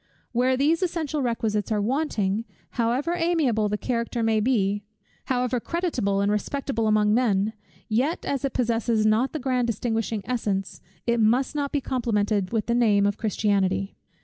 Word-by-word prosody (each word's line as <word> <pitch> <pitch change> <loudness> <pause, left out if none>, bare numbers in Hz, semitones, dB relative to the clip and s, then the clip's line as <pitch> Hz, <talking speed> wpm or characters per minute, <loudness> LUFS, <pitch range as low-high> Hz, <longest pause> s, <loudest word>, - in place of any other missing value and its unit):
Where 255 +2 +2
these 310 +6 +2
essential 320 -5 -1
requisites 225 -4 -1
are 215 - +2
wanting, 220 -4 0 0.3
however 250 +8 0
amiable 310 -12 +1
the 210 - -1
character 235 0 -2
may 220 -1 +2
be, 205 -4 +1 0.4
however 250 -1 0
creditable 245 - -1
and 200 +1 +2
respectable 230 +1 -1
among 210 -1 +3
men; 215 -3 +2 0.3
yet 260 +10 0
as 275 -1 -2
it 275 - 0
possesses 230 -2 +1
not 220 +5 +3
the - - -3
grand 255 -3 0
distinguishing 225 -2 -2
essence, 205 -5 -2 0.2
it 235 0 +1
must 240 +6 +2
not 285 -2 -2
be 290 - 0
complimented 210 -6 0
with 225 -2 0
the 235 - 0
name, 215 -4 +3
of 205 0 0
Christianity. 195 -2 0
230 Hz, 155 wpm, -25 LUFS, 210-260 Hz, 0.4 s, among